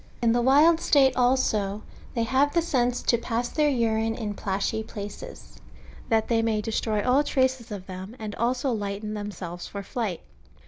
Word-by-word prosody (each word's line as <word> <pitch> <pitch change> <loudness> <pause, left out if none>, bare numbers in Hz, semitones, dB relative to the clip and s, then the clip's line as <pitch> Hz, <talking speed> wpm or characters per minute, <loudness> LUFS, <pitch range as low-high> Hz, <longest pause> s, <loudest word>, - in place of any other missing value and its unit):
In 235 -1 +3
the 240 +1 +2
wild 295 +6 +5
st<ite 270 -5 +4
also, 220 -5 +1 0.3
they 230 - +1
have 265 +6 +2
the 340 - +4
sense 250 -5 0
to 235 - +2
pass 235 +1 -2
their 300 -1 +2
urine 225 -3 +1
in 215 -3 -4
plashy 200 +2 -2
places, 220 - -9 0.5
that 220 -1 +2
they 230 -1 +2
may 225 -1 +1
destroy 215 -1 -1
all 265 +4 +4
traces 260 -4 0
of 200 -3 -6
them, 190 +4 -8
and 215 -3 -6 0.2
so 260 +1 -1
lighten 210 -1 -3
themselves 195 -4 -6
for 200 -1 -6
flight. 205 -4 -3
225 Hz, 170 wpm, -26 LUFS, 210-255 Hz, 0.5 s, wild